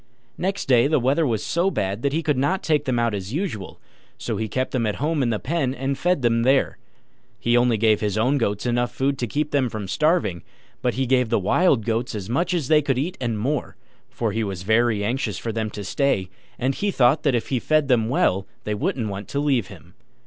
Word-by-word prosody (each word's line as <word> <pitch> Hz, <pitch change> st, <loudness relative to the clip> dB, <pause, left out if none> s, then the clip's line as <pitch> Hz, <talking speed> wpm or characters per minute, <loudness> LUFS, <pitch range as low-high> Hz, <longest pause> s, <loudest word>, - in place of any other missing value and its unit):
Next 195 Hz, +2 st, -2 dB
day 125 Hz, -1 st, +4 dB
the 155 Hz, -, +2 dB
weather 140 Hz, +5 st, +2 dB
was 110 Hz, -4 st, -1 dB
so 175 Hz, +3 st, +1 dB
bad 100 Hz, -, -2 dB
that 140 Hz, -, 0 dB
he 160 Hz, +3 st, -1 dB
could 150 Hz, -2 st, +1 dB
not 145 Hz, +9 st, 0 dB
take 150 Hz, -1 st, +1 dB
them 130 Hz, -2 st, 0 dB
out 120 Hz, -2 st, +1 dB
as 100 Hz, +2 st, -5 dB
usual: 155 Hz, -, -4 dB, 0.4 s
so 115 Hz, -, -3 dB
he 110 Hz, +1 st, -2 dB
kept 130 Hz, +3 st, -2 dB
them 120 Hz, -4 st, 0 dB
at 105 Hz, -, -1 dB
home 150 Hz, +1 st, 0 dB
in 125 Hz, -, +1 dB
the 110 Hz, -, 0 dB
pen, 135 Hz, 0 st, -1 dB
and 135 Hz, +2 st, -2 dB
fed 175 Hz, -2 st, 0 dB
them 115 Hz, -1 st, +3 dB
there. 130 Hz, +3 st, +2 dB, 0.6 s
He 120 Hz, 0 st, +1 dB
only 120 Hz, -1 st, +3 dB
gave 110 Hz, -1 st, +3 dB
his 105 Hz, -1 st, -1 dB
own 130 Hz, +6 st, +2 dB
goats 105 Hz, -2 st, -1 dB
enough 120 Hz, 0 st, 0 dB
food 135 Hz, 0 st, -1 dB
to 120 Hz, -, -1 dB
keep 150 Hz, +6 st, -2 dB
them 135 Hz, -4 st, +1 dB
from 105 Hz, -3 st, -5 dB
starving, 150 Hz, -, +1 dB, 0.4 s
but 125 Hz, -, 0 dB
he 130 Hz, +1 st, 0 dB
gave 125 Hz, -2 st, +2 dB
the 115 Hz, -, +2 dB
Wild 115 Hz, -, +2 dB
Goats 115 Hz, +1 st, -1 dB
as 105 Hz, +1 st, -5 dB
much 175 Hz, +8 st, 0 dB
as 155 Hz, -7 st, -1 dB
they 155 Hz, 0 st, +5 dB
could 135 Hz, -3 st, 0 dB
eat 165 Hz, +8 st, -2 dB
and 120 Hz, -3 st, -1 dB
more; 140 Hz, +8 st, -2 dB, 0.3 s
for 120 Hz, -3 st, -2 dB
he 110 Hz, +2 st, -1 dB
was 95 Hz, -3 st, -4 dB
very 110 Hz, 0 st, +2 dB
anxious 110 Hz, -3 st, -1 dB
for 115 Hz, -, -4 dB
them 110 Hz, -1 st, -2 dB
to 105 Hz, 0 st, -7 dB
stay, 95 Hz, -3 st, 0 dB, 0.3 s
and 130 Hz, +2 st, 0 dB
he 205 Hz, +8 st, -1 dB
thought 135 Hz, -4 st, +3 dB
that 140 Hz, -4 st, +2 dB
if 120 Hz, -, -2 dB
he 130 Hz, -, +1 dB
fed 155 Hz, +2 st, +2 dB
them 115 Hz, -4 st, +2 dB
well 95 Hz, -7 st, +1 dB, 0.2 s
they 105 Hz, -, -2 dB
wouldn't 110 Hz, +2 st, -1 dB
want 100 Hz, +1 st, -6 dB
to 140 Hz, -, -2 dB
leave 135 Hz, -8 st, +1 dB
him. 90 Hz, -2 st, -14 dB
125 Hz, 235 wpm, -23 LUFS, 110-140 Hz, 0.6 s, they